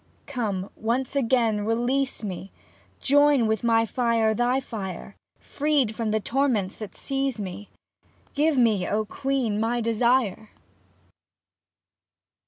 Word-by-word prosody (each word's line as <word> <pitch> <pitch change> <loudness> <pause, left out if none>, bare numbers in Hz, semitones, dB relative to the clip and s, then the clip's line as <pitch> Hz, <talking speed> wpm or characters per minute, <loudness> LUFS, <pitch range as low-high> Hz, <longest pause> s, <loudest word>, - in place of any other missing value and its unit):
Come, 210 -8 -3
once 245 +5 -2
again 235 -4 +2
to 205 - -3
release 240 +4 0
me, 195 -1 -6 0.5
Join 290 -3 +4
with 220 0 0
my 230 -1 +3
fire 230 -2 +1
thy 245 +4 +1
fire. 200 -6 -7 0.2
Freed 285 -6 0
from 225 -1 -2
the 220 +1 +1
torments 230 -5 0
that 215 -2 -8
seize 270 -4 -2
me. 200 +1 -6 0.6
Give 300 0 +2
me, 220 -7 +3
O 215 +1 0
Queen! 255 -2 -1
my 230 +2 0
desire 230 -2 +1
230 Hz, 120 wpm, -25 LUFS, 215-265 Hz, 0.6 s, Join